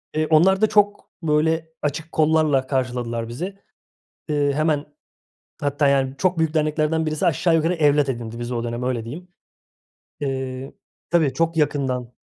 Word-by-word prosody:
Eee, 155 0 +1
onlar 185 +5 +4
da 215 - +5
çok, 205 -1 +1
böyle, 160 +1 +1
açık 150 +2 -3
kollarla 155 -4 +2
karşıladılar 120 -3 -2
bizi. 175 - -5 0.7
Eee, 145 -1 +2
hemen 155 0 +1 0.8
Hatta, 145 0 +1
yani, 135 -1 +2
çok 185 0 +1
büyük 160 -1 +1
derneklerden 155 +1 +1
birisi 155 +3 -1
aşağı 170 +1 +2
yukarı 165 +2 +2
evlat 145 -3 +3
edindi 115 -2 -5
bizi 120 +1 -4
o 115 -1 -2
dönem. 120 +1 -4
Öyle 125 -3 -2
diyeyim. 160 +10 -8 0.9
Eee, 130 -1 -4 0.4
tabii, 160 -6 +3
çok 165 0 0
yakından. 130 -5 0
150 Hz, 145 wpm, -22 LUFS, 130-160 Hz, 0.9 s, da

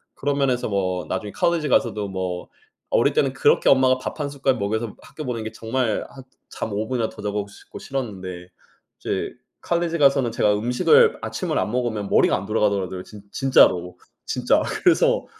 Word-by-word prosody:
그런 145 0 -1
면에서 130 -4 0
뭐 95 -3 -1
나중에 105 -1 -4
college 170 -3 +1
가서도 105 -5 +1
뭐 95 -2 -4 0.5
어릴 - - +3
때는 460 - +1
그렇게 460 -1 +3
엄마가 130 -1 +5
밥 130 - -6
1 145 - -2
숟갈 135 -2 0
먹여서 110 +1 -2
학교 155 - -9
보낸 115 -3 -3
게 110 - -5
정말 115 0 -2
한 135 - -12 0.3
잠 110 - -5
5 105 +2 -2
분이나 120 -4 -1
더 110 - -11
자고 105 0 -2
싶고 - - -13
싫었는데 95 -9 -5 0.5
이제 - - -3 0.3
college 170 -1 0
가서는 135 -4 +4
제가 105 -2 +2
음식을 435 - +4
아침을 170 -4 -3
안 - - -1
먹으면 120 -5 -2
머리가 - - +4
안 95 - -6
돌아가더라고요 100 -3 0
진 105 0 -13
진짜로. 90 -9 +3 0.3
진짜. - - +1 0.2
그래서 - - +3
115 Hz, 395 characters per minute, -23 LUFS, 100-135 Hz, 0.5 s, 엄마가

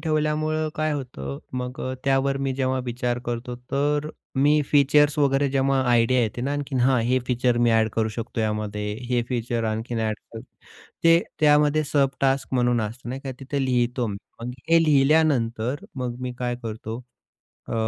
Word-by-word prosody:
ठेवल्यामुळं 155 0 0
काय 155 0 0
होतं 95 - -5 0.2
मग 125 +1 -5
अ, 130 - -3
त्यावर 135 0 +2
मी 135 - 0
जेव्हा 130 0 0
विचार 120 0 -2
करतो 120 +1 -3 0.2
तर 145 +2 0 0.3
मी 145 +2 +4
फीचर्स 145 +1 +4
वगैरे 140 -1 +3
जेव्हा 135 0 +2
आयडिया 120 +1 +4
येते 110 +1 -2
ना 135 +3 -1
आणखीन, 145 -2 -2
हा 130 +1 +4
हे 125 +3 +2
फीचर 125 -1 +1
मी 120 0 +3
ॲड 110 -1 +3
करू 110 -1 0
शकतो 115 +1 -4
यामध्ये. 105 -1 -2 0.2
हे 125 -1 +1
फीचर 120 -2 -1
आणखीन 110 +2 -2
ॲड 110 -1 -1 0.2
करू. 115 - -7 0.6
ते 165 0 +7 0.2
त्यामध्ये 150 0 +4
सब 140 -1 +2
टास्क 135 0 +1
म्हणून 120 -1 +2
असतं 115 +3 -5
नाही 130 +2 -4
का 135 - -5
तिथे 135 +1 -2
लिहितो 125 -1 +1
मी. 100 -2 -4 0.2
मग 120 +1 -4 0.2
हे 165 0 +6
लिहिल्यानंतर 135 -4 +2
मग 125 -2 -3
मी 125 0 -3
काय 125 -1 -1
करतो? 110 0 -5 0.7
अ, - - -4
130 Hz, 170 wpm, -24 LUFS, 120-140 Hz, 0.7 s, ते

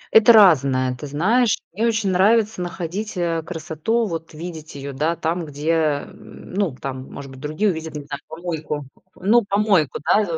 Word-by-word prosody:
Это 220 +2 +8
разное, 135 - +5
ты 145 - -8
знаешь. 210 - +2 0.2
Мне 225 +4 +1
очень 220 -4 +1
нравится 210 +2 +3
находить, 180 +4 -4
э, 170 -2 0
красоту, 165 +7 -2
вот 165 -4 -5
видеть 160 -2 -8
ее, 140 0 -6
да, 155 +5 0
там, 170 +2 -2
где, 150 +1 -2
м, 155 +1 -3
ну, 190 -8 0
там 130 -1 -6
может 135 -1 -8
быть 130 - -12
другие 155 +9 0
увидят, 160 -2 -6
не 145 - -5
знаю, 140 0 -6
помойку. 160 -3 -4 0.3
Ну, 215 +6 +3
помойку, 200 - +2
да. 215 - +4
165 Hz, 170 wpm, -22 LUFS, 150-200 Hz, 0.3 s, Это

